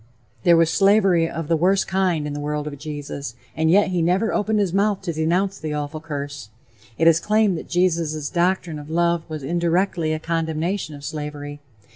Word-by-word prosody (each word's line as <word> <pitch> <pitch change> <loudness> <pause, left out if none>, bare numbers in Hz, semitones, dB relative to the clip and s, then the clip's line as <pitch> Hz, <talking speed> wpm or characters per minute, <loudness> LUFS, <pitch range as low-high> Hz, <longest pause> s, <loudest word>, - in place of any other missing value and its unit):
There 170 -3 +5
was 165 -1 +3
slavery 195 -5 +4
of 165 -2 -5
the 165 - +2
worst 185 +4 +2
kind 185 -5 0
in 150 - -4
the 145 - -4
world 150 0 -3
of 145 -2 -6
Jesus, 145 -4 -6 0.2
and 160 0 +1
yet 200 +3 +4
he 180 -2 0
never 185 +7 +1
opened 215 +1 +1
his 195 -4 0
mouth 200 0 +1
to 170 -3 -2
denounce 180 +5 0
the 155 -1 -4
awful 150 +1 -4
curse. 145 -6 -6 0.5
It 165 - +3
is 165 0 +6
claimed 210 0 +2
that - - -11
Jesus' 165 -4 0
doctrine 175 -3 0
of 145 +1 -10
love 170 +1 +1
was 155 -3 -5
indirectly 170 +1 0
a 155 - 0
condemnation 165 +1 -2
of 140 - -12
slavery. 145 -1 -6
165 Hz, 190 wpm, -22 LUFS, 150-185 Hz, 0.5 s, is